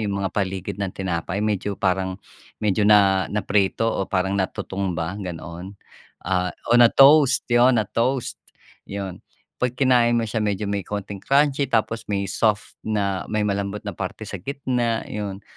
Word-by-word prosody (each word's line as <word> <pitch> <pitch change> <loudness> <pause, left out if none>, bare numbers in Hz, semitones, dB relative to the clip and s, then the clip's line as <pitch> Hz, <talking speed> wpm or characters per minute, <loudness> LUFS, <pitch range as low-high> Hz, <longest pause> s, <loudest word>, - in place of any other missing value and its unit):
yung 100 -2 -2
mga 95 - -2
paligid 95 0 -3
ng 100 -2 -1
tinapay 90 0 -3
medyo 105 -1 -1
parang, 95 0 0 0.5
medyo 105 0 +1
na 100 -3 +4
naprito 105 +1 0
o 100 -4 -1
parang 95 0 0
natutong 95 -1 -3
ba, 85 +2 -2
ganoon. 90 +1 -7 0.5
Ah, 90 -1 0 0.2
o - - +6
na-toast, 135 +3 +6
yun 120 +1 +5
na-toast, 120 +5 -1 0.5
yun. 95 -2 -5 0.4
'Pag 125 -1 -1
kinain 125 -3 +4
mo - - 0
siya 110 +1 -2
medyo 105 -1 -1
may 100 -1 -1
kaunting 100 -1 -5
crunchy 140 0 +2
tapos 115 0 0
may 100 -1 -1
soft 105 -2 0
na, 100 -3 -1
may 105 0 0
malambot 100 +1 -2
na 105 - -1
parte 95 +4 -6
sa 100 - -6
gitna, 120 0 -2
yun. 100 -1 -5
100 Hz, 155 wpm, -23 LUFS, 95-115 Hz, 0.5 s, o